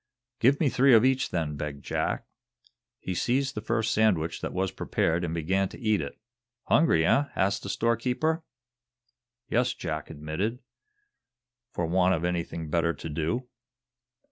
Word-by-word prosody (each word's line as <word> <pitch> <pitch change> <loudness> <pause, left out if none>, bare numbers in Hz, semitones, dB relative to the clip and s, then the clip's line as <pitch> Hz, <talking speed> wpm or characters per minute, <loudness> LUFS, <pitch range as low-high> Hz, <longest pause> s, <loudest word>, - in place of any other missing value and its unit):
"Give 135 +4 +4
me 155 - +3
three 130 -1 +5
of 110 +2 +6
each, 130 0 +2
then," 80 -4 -2
begged 70 -1 -6
Jack. - - -1 0.7
He 95 - -4
seized 130 +7 0
the 105 - -4
first 110 +1 0
sandwich 90 -7 +1
that - - -3
was 95 +1 -1
prepared 85 +1 0
and 85 - -2
began 90 +4 0
to - - -11
eat 110 -5 +1
it. 70 - -6 0.5
"Hungry, 120 - +3
eh!" 140 +11 +4
asked 100 +1 +1
the 100 - -6
storekeeper. 125 - 0 1.0
"Yes," 125 +2 +1
Jack 80 -3 -4
admitted; 80 +10 -3 1.1
"for 85 -9 -2
want 90 +2 +3
of 85 +1 -2
anything 85 -2 -2
better 85 0 +2
to 80 - -7
do." 80 - -2
95 Hz, 150 wpm, -27 LUFS, 80-120 Hz, 1.1 s, of